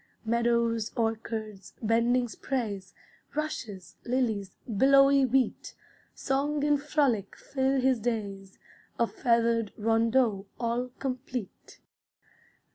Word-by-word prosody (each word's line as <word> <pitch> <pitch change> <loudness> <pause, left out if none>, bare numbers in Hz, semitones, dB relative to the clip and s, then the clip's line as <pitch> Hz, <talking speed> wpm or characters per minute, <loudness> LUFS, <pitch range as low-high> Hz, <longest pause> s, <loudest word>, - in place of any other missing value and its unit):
Meadows, 235 -1 +1
orchards, 220 -3 -3
bending 235 +2 +2
sprays, 210 -6 -4 0.4
Rushes, 225 - -5
lilies, 225 -6 -1
billowy 275 +4 +5
wheat, 255 -1 0 0.4
Song 285 +2 -1
and 295 -1 +2
frolic 275 - 0
fill 265 0 0
his 260 -1 +2
days, 200 -4 -4 0.4
A 235 - +3
feathered 230 -2 +1
rondeau 225 -1 +2
all 235 +1 -1
complete. 255 -4 -6
235 Hz, 90 wpm, -28 LUFS, 220-265 Hz, 0.4 s, billowy